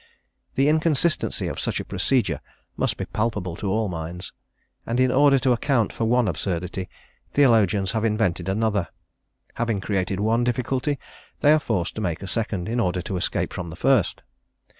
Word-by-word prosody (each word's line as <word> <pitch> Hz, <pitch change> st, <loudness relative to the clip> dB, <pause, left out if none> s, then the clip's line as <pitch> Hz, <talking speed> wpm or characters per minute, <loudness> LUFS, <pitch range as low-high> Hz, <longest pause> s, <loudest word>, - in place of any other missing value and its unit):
The 135 Hz, +2 st, +3 dB
inconsistency 160 Hz, +1 st, +1 dB
of -, -, -4 dB
such -, -, -1 dB
a -, -, -5 dB
procedure 95 Hz, -, 0 dB, 0.3 s
must -, -, 0 dB
be -, -, -3 dB
palpable 105 Hz, -6 st, -2 dB
to 100 Hz, -, -3 dB
all 110 Hz, +2 st, +1 dB
minds; 85 Hz, 0 st, -6 dB, 0.5 s
and 120 Hz, +2 st, -2 dB
in 130 Hz, 0 st, +4 dB
order 140 Hz, +1 st, +5 dB
to 130 Hz, -1 st, +2 dB
account 120 Hz, -2 st, +1 dB
for 115 Hz, -, -1 dB
one 120 Hz, 0 st, +3 dB
absurdity, 90 Hz, +1 st, -3 dB, 0.4 s
theologians 105 Hz, -8 st, +4 dB
have 110 Hz, -1 st, -1 dB
invented 105 Hz, -5 st, 0 dB
another; 105 Hz, -3 st, 0 dB, 0.7 s
having 115 Hz, -3 st, -1 dB
created 95 Hz, -1 st, -1 dB
one 115 Hz, +3 st, +2 dB
difficulty, 125 Hz, +3 st, 0 dB, 0.4 s
they 150 Hz, -, +6 dB
are 155 Hz, -, +4 dB
forced 105 Hz, -, -1 dB
to 110 Hz, -, -5 dB
make 85 Hz, -3 st, -2 dB
a -, -, -5 dB
second, 105 Hz, -4 st, -2 dB
in 120 Hz, +2 st, -1 dB
order 90 Hz, -4 st, 0 dB
to 95 Hz, -, -4 dB
escape 90 Hz, -, -1 dB
from 90 Hz, -2 st, -5 dB
the 80 Hz, -, -8 dB
first. 130 Hz, +1 st, +2 dB
110 Hz, 170 wpm, -24 LUFS, 95-125 Hz, 0.7 s, they